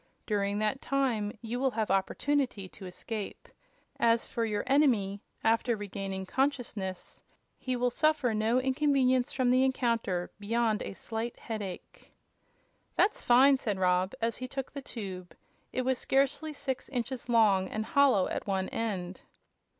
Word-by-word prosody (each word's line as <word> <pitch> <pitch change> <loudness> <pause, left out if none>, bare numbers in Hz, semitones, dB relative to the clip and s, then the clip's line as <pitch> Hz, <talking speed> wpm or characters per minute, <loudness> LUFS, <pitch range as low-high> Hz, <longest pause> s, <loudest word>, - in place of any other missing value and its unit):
During 200 -1 0
that 215 +5 0
time 245 -7 0
you 235 +2 -3
will 265 0 +2
have 220 -5 -2
opportunity 215 +2 0
to 190 0 -10
escape. 205 +3 -6 0.5
As 230 0 +3
for 230 - -2
your 210 -2 -1
enemy, 235 -8 +2 0.2
after 230 +1 +2
regaining 195 -2 -5
consciousness 235 -7 -2 0.4
he 255 -1 -2
will 245 0 +1
suffer 295 -3 +2
no 220 +3 +2
inconvenience 260 -1 +2
from 255 -2 +1
the 255 +1 +4
encounter 230 -9 0
beyond 220 +1 0
a - - -5
slight 225 +3 -5
headache." 205 -5 -7 0.8
"That's 410 - +2
fine!" 265 +3 +6
said 210 -6 -2
Rob, 185 +2 +2
as 230 0 0
he 255 - -5
took 270 0 -5
the 280 - -5
tube. 190 -8 -7 0.4
It 255 - -1
was 260 0 +1
scarcely 275 +3 +1
six 265 -3 -4
inches 250 -1 -3
long, 205 -5 +4
and 215 0 -3
hollow 265 -9 +4
at - - -4
one 190 -1 0
end. 190 -5 -3
230 Hz, 145 wpm, -30 LUFS, 200-260 Hz, 0.8 s, fine